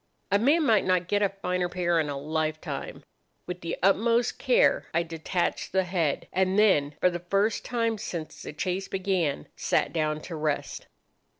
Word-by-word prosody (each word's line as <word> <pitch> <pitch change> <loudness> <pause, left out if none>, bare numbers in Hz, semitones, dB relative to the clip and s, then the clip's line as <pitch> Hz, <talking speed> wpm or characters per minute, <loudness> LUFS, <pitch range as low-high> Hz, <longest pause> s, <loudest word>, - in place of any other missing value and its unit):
A 200 - +4
man 295 +8 +3
might 220 -5 +4
not 185 -2 +1
get 205 +1 +1
a 200 - +3
finer 180 -2 -2
pair 175 -1 +1
in 155 -2 0
a 140 - -3
lifetime. 155 +2 -3 0.4
With 180 0 -6
the 170 - -3
utmost 230 +5 +2
care - - +3
I 170 - +3
detached 165 +3 -2
the 190 0 +3
head, 170 -5 -1
and 190 +1 +1
then, 150 -9 +3
for 180 - +3
the 175 - -4
first 200 +5 0
time 230 -3 -1
since 165 -6 -6
the - - -6
chase 185 +5 -3
began, 185 - -1
sat - - 0
down 155 -2 0
to 170 - -7
rest. 150 -2 -3
180 Hz, 175 wpm, -27 LUFS, 160-200 Hz, 0.4 s, A